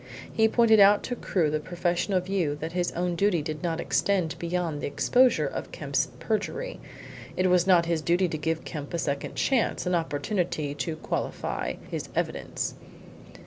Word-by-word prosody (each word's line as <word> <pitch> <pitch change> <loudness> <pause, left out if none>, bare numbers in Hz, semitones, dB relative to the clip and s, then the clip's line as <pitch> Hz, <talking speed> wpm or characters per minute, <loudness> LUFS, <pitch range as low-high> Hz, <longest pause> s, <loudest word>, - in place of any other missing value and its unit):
He 220 0 +4
pointed 220 -1 +5
out 205 +1 +7
to 245 - -3
Crewe 170 -9 0
the 155 - 0
professional 175 +3 0
view 180 -5 -1
that 160 +2 -5
his 175 0 -1
own 175 +1 -1
duty 175 -3 +2
did 155 0 -4
not 170 -2 -1
extend 185 -5 +1
beyond 170 -3 -2
the - - -2
exposure 250 - +3
of - - -5
Kemp's - - -1
perjury. 350 - -2 0.6
It 185 0 +3
was 180 0 +4
not 175 -3 +5
his 165 -2 0
duty 175 +4 +2
to 155 - -3
give 160 +1 -2
Kemp 150 0 -5
a - - 0
second 140 -4 -2
chance 255 -7 +1
an 180 - 0
opportunity 160 -1 -1
to 145 +3 -3
qualify 155 - -3 0.2
his - - -4
evidence. - - -2
175 Hz, 170 wpm, -27 LUFS, 160-195 Hz, 0.6 s, out